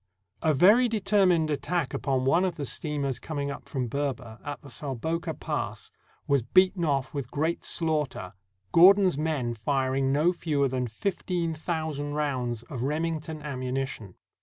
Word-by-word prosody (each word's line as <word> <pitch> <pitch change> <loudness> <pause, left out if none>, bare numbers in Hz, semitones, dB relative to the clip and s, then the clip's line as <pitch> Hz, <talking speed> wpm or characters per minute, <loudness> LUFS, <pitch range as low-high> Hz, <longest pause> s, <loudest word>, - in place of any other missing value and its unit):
A 155 -2 +2
very 210 - +6
determined 190 -7 +2
attack 160 +1 -1
upon 130 -2 0
one 165 +7 +4
of 185 -3 0
the 145 - -4
steamers 140 -2 -2
coming 145 -3 -3
up - - -9
from 130 -4 -2
Berber, 130 -3 -3
at 145 -1 -5
the 140 - -11
Salboka 145 +7 -3
Pass, - - -4 0.4
was 140 -2 +3
beaten 185 - +3
off 140 -4 0
with 140 -4 -4
great 160 +3 -1
slaughter, 150 - -1 0.4
Gordon's 185 - +7
men 150 -7 -1
firing 135 +3 0
no 155 +6 +3
fewer 150 -5 0
than 125 -1 -2
fifteen 170 - -2
thousand 155 -3 -3
rounds 125 -6 -1
of 120 0 -7
Remington 155 +2 -2
ammuni 135 -2 -2
tion. 100 -8 -9
145 Hz, 150 wpm, -27 LUFS, 130-165 Hz, 0.4 s, Gordon's